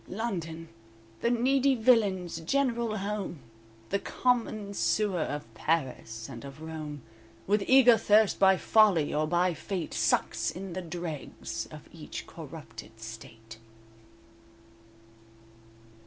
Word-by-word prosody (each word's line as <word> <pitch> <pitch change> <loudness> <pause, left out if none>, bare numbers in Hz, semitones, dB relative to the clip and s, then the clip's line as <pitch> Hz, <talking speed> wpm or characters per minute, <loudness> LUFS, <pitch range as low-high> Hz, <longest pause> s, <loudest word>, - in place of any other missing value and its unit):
_"London, 170 -6 -4 0.5
the 235 - +1
needy 265 +3 +3
villain's 200 -8 +2
general 235 +3 0
home, 200 -3 -3 0.5
The 200 - +1
common 220 -5 0
sewer 200 -3 +1
of 145 -6 -4
Paris 125 -5 -2
and 120 -4 -9
of 140 +2 -10
Rome; 155 -3 -7 0.4
With 205 +1 +2
eager 250 -4 +7
thirst 215 -1 +4
by 190 -1 +6
folly 200 -10 +4
or 155 +1 +1
by 175 +2 +2
fate, 175 +2 -4
Sucks - - +1
in 185 0 -6
the 185 - -3
dregs 170 -3 -5
of - - -12
each - - -8
corrupted 115 - -10
state." 115 0 -10
185 Hz, 110 wpm, -29 LUFS, 155-215 Hz, 0.5 s, eager